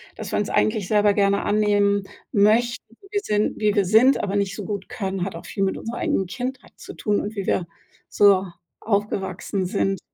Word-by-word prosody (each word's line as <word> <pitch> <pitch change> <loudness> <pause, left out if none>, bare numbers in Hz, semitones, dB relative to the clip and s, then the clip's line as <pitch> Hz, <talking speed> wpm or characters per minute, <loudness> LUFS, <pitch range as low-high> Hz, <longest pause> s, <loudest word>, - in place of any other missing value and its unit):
dass - - -7
wir - - 0
uns - - -2
eigentlich 110 - +1
selber 210 0 +3
gerne 200 -1 +2
annehmen 205 -1 +2 0.3
möchten 230 +5 +3 0.3
wir 410 -1 0
sind 210 - 0
wie 210 -1 +2
wir 200 -2 +3
sind, 225 +8 +5
aber 200 0 -2
nicht 200 -1 0
so 210 - -6
gut 200 -1 -5
können, 195 -6 -3
hat 195 - -6
auch 165 - -9
viel 195 - -3
mit 190 - 0
unserer 235 +1 -6
eigenen 190 - 0
Kindheit 255 +6 -6
zu - - -10
tun 210 -2 0
und 210 +2 -6
wie 195 -2 -4
wir 175 - +1 0.4
so 200 -2 +4 0.4
aufgewachsen 200 -2 -2
sind. 195 0 -1
205 Hz, 195 wpm, -23 LUFS, 195-215 Hz, 0.4 s, sind